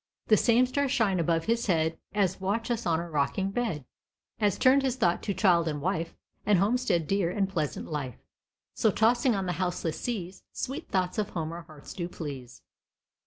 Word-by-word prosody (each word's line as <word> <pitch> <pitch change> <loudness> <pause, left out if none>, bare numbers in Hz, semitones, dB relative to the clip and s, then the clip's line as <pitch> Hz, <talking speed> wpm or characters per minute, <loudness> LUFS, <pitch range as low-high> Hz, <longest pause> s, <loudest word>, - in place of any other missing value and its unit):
The 215 - +8
same 235 +3 +4
stars 275 +1 0
shine 215 -9 +2
above 165 0 +1
his 230 +1 0
head 160 -3 +2 0.2
As 190 -2 +1
watch 225 +5 -1
us 235 -4 -1
on 165 -1 +2
our 170 0 -6
rocking 155 +7 0
bed; 185 - -2 0.5
As 205 -4 +2
turned 265 +2 +5
his 265 -2 0
thoughts 180 -9 +1
to 200 - +1
child 175 -5 +3
and 150 -2 -2
wife, 165 +1 -2 0.3
And 205 -2 +4
homestead 200 -4 +1
dear, 195 0 +1
and 195 +1 0
pleasant 165 -7 -3
life; 145 -6 -4 0.6
So, 220 - +2
tossing 235 +3 +3
on 195 -1 -1
the 180 - -1
houseless 175 -3 -2
seas 190 -7 -4
Sweet 275 +6 -5
thoughts 185 0 0
of 210 -1 -1
home 160 -2 -3
our 170 +1 -6
hearts 155 -4 -12
do 175 -1 -4
please. 135 -7 -8
190 Hz, 190 wpm, -28 LUFS, 165-225 Hz, 0.6 s, The